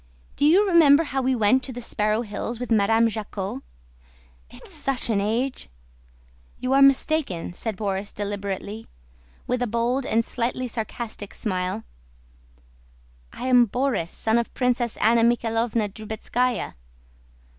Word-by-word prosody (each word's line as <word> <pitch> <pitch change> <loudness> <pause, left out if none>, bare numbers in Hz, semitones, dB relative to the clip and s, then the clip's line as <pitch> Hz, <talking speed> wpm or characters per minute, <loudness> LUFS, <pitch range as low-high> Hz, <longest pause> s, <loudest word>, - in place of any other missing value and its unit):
Do - - +1
you 375 +7 +5
remember 325 -4 +6
how 270 -3 -2
we 260 0 +1
went 230 +3 +3
to 260 - -4
the 245 - -7
Sparrow 215 -1 0
Hills 220 +2 -5
with 245 -1 -5
Madame 225 +2 +4
Jacquot?... 210 -3 -4 0.9
It's - - -13
such 265 -3 -1
an 200 -2 +1
age..." 235 - -2 0.9
"You 255 +1 -1
are 275 - +5
mistaken," 275 - +2
said 215 +2 -5
Borís 200 -1 -2
deliberately, 205 +1 -5 0.6
with 250 0 -1
a 245 - +1
bold 235 +4 0
and 230 +1 +1
slightly 250 +1 -2
sarcastic 225 -2 -5
smile. 185 - -2 1.5
"I - - -7
am 250 -2 +5
Borís, 250 -6 -1
son 225 +5 +1
of 235 - -3
Princess 245 -2 0
Anna 230 +1 +4
Mikháylovna 230 -2 +1
Drubetskáya. 225 +3 -2
230 Hz, 135 wpm, -24 LUFS, 210-255 Hz, 1.5 s, remember